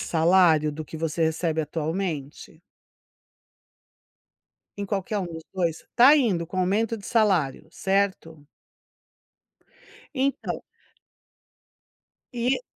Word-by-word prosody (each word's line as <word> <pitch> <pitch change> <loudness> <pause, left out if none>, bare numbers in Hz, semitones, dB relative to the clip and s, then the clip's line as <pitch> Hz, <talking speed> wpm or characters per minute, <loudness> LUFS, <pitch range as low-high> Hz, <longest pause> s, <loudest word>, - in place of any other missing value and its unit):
salário 165 -2 +3
do 155 +2 -6
que 160 - -9
você 165 +1 -2
recebe 160 0 0
atualmente? 160 -1 -4 2.2
Em 200 - -3
qualquer 200 +1 -2
um 190 - -3
dos 165 -1 -8
dois 170 -4 -2
tá 265 +5 +7
indo 200 - +1
com 185 +3 -5
aumento 205 +5 +1
de 205 - -12
salário, 180 - +1
certo? 190 -5 -1 1.7
Então 270 -1 -1 1.7
E 245 - 0
175 Hz, 95 wpm, -25 LUFS, 160-200 Hz, 2.2 s, tá